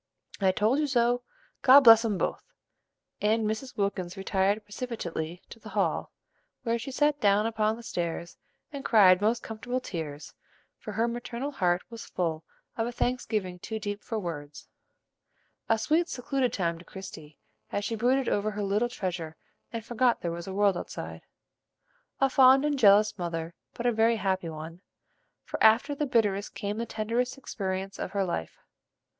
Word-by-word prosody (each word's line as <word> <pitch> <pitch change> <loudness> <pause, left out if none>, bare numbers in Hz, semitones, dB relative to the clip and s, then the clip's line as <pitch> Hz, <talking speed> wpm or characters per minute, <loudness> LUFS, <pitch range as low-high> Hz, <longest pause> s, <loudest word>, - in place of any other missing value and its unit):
"I 190 -2 +4
told 215 +8 +2
you 300 - +1
so; 245 -2 +2 0.4
God 270 +2 +9
bless 225 -3 +9
'em 215 -4 0
both!" - - -2 0.8
and 220 +1 +2
Mrs. 220 +5 -3
Wilkins 195 -2 -2
retired 195 +2 +1
precipitately 180 -7 -5
to 230 - -10
the - - -11
hall, - - -1 0.5
where 235 -1 0
she 245 - -6
sat 295 +2 +1
down 205 +1 +4
upon 220 -1 +1
the 235 - -11
stairs 170 -6 -4 0.4
and 280 -1 -6
cried 190 -5 +6
most 225 +3 +1
comfortable 245 +3 -3
tears; 160 - -6 0.5
for - - -7
her 230 +1 +1
maternal 240 +3 -4
heart 180 -9 +1
was 230 -1 -8
full 165 -3 -2 0.3
of 225 0 0
a - - -3
thanksgiving 220 -7 -2
too 220 +4 -5
deep 205 -1 -4
for 225 - -4
words. 150 -7 -6 1.0
A 225 - +4
sweet, 320 +9 +1
secluded 255 0 -1
time 170 -5 -1
to - - -13
Christie, 160 -6 -10 0.3
as 205 - -2
she 225 - -2
brooded 250 +4 +2
over 205 +1 +1
her 210 0 -4
little 210 +5 +1
treasure 175 -7 -4 0.4
and 230 -2 -5
forgot 240 +1 +1
there 170 - -2
was 170 +1 -6
a 190 - -5
world 200 -2 +3
outside. - - -7 1.0
A 270 - +4
fond 265 +1 +6
and 290 -2 0
jealous 205 -1 +5
mother, 165 -1 -3 0.2
but 240 - -5
a 245 - +4
very 225 +1 +3
happy 190 -4 -1
one, 160 +2 -8 0.6
for - - -6
after 225 +6 +5
the 290 +1 -2
bitterest 205 -5 +1
came 205 +2 -3
the 235 - -3
tenderest 230 +5 -1
experience 195 -6 -4
of - - -4
her 200 -1 +1
life. 125 - -4
215 Hz, 170 wpm, -28 LUFS, 185-240 Hz, 1.0 s, God